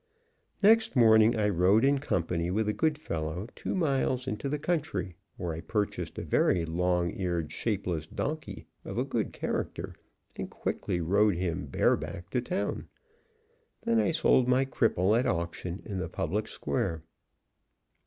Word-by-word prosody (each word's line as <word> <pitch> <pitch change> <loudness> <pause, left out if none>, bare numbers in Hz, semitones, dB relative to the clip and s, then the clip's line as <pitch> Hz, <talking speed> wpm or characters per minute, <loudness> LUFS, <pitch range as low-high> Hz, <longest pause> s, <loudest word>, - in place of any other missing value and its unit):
Next 220 -1 +5
morning 110 -1 +6
I 105 -1 +2
rode 95 +5 +4
in 140 0 +3
company 85 - -1
with 105 +4 0
a 105 - +1
good 155 +3 +1
fellow 85 - -4
two - - -4
miles 135 -6 +1
into 130 +2 -3
the 150 - -1
country, 145 - -2 0.2
where 85 -3 -3
I 80 - -5
purchased 105 +3 -2
a - - -3
very 85 -2 +2
long 90 +1 0
eared, 85 -4 -2
shapeless 90 -8 -2
donkey, 155 - -4 0.2
of - - -6
a - - +2
good - - -2
character, - - -3 0.4
and - - -5
quickly 90 - -2
rode 100 +4 +3
him 85 -2 -2
bare - - +3
back 90 +3 -7
to 125 - +1
town. 185 +7 -3 1.0
Then 230 0 +2
I - - +2
sold 130 -5 +3
my 130 +2 +3
cripple 110 -6 +2
at 125 +3 +2
auction 85 +1 -3
in 100 -4 -4
the 90 - -3
public 105 +7 -2
square. 80 -1 -2
105 Hz, 155 wpm, -29 LUFS, 85-130 Hz, 1.0 s, morning